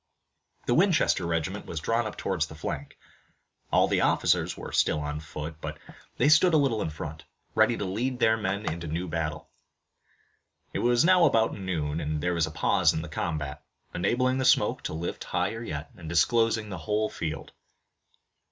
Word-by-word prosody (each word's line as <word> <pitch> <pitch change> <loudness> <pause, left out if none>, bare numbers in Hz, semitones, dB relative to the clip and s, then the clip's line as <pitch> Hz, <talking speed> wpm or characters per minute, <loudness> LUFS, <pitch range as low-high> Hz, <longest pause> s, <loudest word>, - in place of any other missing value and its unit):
The 120 - +2
Winchester 165 - +3
regiment 85 +4 -2
was 80 - -4
drawn 115 +7 0
up 105 - -8
towards 85 -5 -1
the 80 - -11
flank. 75 - -5 0.7
All - - +4
the - - +1
officers - - +2
were - - -7
still 75 - +2
on 75 0 -3
foot, 75 0 -7
but - - -5 0.4
they 130 - +3
stood 160 +3 +6
a - - +7
little 130 -7 +1
in 80 - -1
front, 75 0 -7 0.3
ready - - +3
to 100 - -3
lead 120 +7 -2
their 110 -2 +4
men 100 -1 -2
into 85 +1 -3
the 75 - -4
new 90 +3 -2
battle. 80 -2 -4 1.2
It - - -1
was 120 +3 +3
now 180 -1 +6
about 115 -6 +3
noon, 80 -6 -2
and 75 -1 -2
there 90 +4 0
was 85 -2 +1
a - - -5
pause - - +2
in 80 - -3
the 85 - -8
combat, 75 -2 -3 0.3
enabling 130 +8 +1
the - - +1
smoke 130 - +3
to - - -3
lift 85 +2 -4
yet - - -13
higher, 80 -10 -2
and 80 -2 -9
disclosing 110 +5 +2
the 95 -3 -5
whole 105 +7 0
field. 80 -5 -5
90 Hz, 185 wpm, -27 LUFS, 80-115 Hz, 1.2 s, a